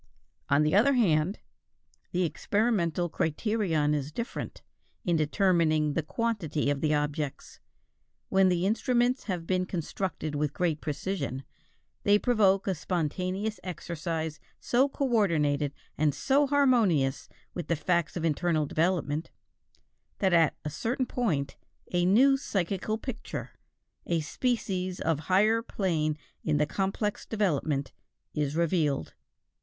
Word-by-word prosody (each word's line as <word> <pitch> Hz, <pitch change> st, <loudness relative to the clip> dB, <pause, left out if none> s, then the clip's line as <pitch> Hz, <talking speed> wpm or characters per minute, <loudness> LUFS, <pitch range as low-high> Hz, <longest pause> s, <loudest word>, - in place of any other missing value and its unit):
On 145 Hz, +2 st, +4 dB
the 150 Hz, -, +1 dB
other 235 Hz, +8 st, +5 dB
hand, 180 Hz, -4 st, +2 dB, 0.7 s
the 180 Hz, +1 st, +1 dB
experimental 175 Hz, 0 st, 0 dB
criterion 160 Hz, -2 st, 0 dB
is 145 Hz, 0 st, -2 dB
different, 235 Hz, -, -5 dB, 0.4 s
in 175 Hz, -, +2 dB
determining 155 Hz, -2 st, +2 dB
the 165 Hz, -, +1 dB
quantity 165 Hz, -6 st, -1 dB
of 140 Hz, -1 st, -2 dB
the 155 Hz, -, +1 dB
objects. 150 Hz, -1 st, -2 dB, 0.7 s
When 190 Hz, -1 st, +4 dB
the 180 Hz, 0 st, +1 dB
instruments 245 Hz, +4 st, +1 dB
have 180 Hz, -5 st, -3 dB
been 185 Hz, +1 st, 0 dB
constructed 175 Hz, -2 st, -3 dB
with 145 Hz, 0 st, -1 dB
great 165 Hz, -4 st, 0 dB
precision, 145 Hz, -4 st, -3 dB, 0.6 s
they 205 Hz, 0 st, +5 dB
provoke 205 Hz, -5 st, +3 dB
a 195 Hz, -, +1 dB
spontaneous 185 Hz, +5 st, -2 dB
exercise 165 Hz, -3 st, -4 dB, 0.2 s
so 260 Hz, +4 st, +2 dB
coordinated 165 Hz, -, +1 dB, 0.3 s
and 150 Hz, -2 st, +2 dB
so 280 Hz, +1 st, +2 dB
harmonious 230 Hz, -, +2 dB, 0.2 s
with 175 Hz, -4 st, -5 dB
the 170 Hz, -, +1 dB
facts 170 Hz, +2 st, 0 dB
of 165 Hz, -, -2 dB
internal 160 Hz, 0 st, +1 dB
development, 160 Hz, -1 st, 0 dB, 0.9 s
that 190 Hz, -2 st, +2 dB
at 165 Hz, -2 st, +4 dB
a 150 Hz, -, -2 dB
certain 245 Hz, -, -1 dB
point 160 Hz, -, -1 dB, 0.3 s
a 175 Hz, 0 st, +2 dB
new 265 Hz, +8 st, +5 dB
psychical 200 Hz, -, -2 dB
picture, 235 Hz, +1 st, -6 dB, 0.6 s
a 170 Hz, -2 st, +1 dB
species 185 Hz, -1 st, -2 dB
of 160 Hz, -2 st, 0 dB
higher 215 Hz, +5 st, +4 dB
plane 160 Hz, -9 st, -1 dB, 0.3 s
in 150 Hz, -1 st, +1 dB
the 150 Hz, -, +3 dB
complex 195 Hz, +5 st, -2 dB
development, 155 Hz, -9 st, -1 dB, 0.4 s
is 150 Hz, -1 st, -1 dB
revealed. 160 Hz, -4 st, 0 dB
175 Hz, 125 wpm, -28 LUFS, 155-210 Hz, 0.9 s, other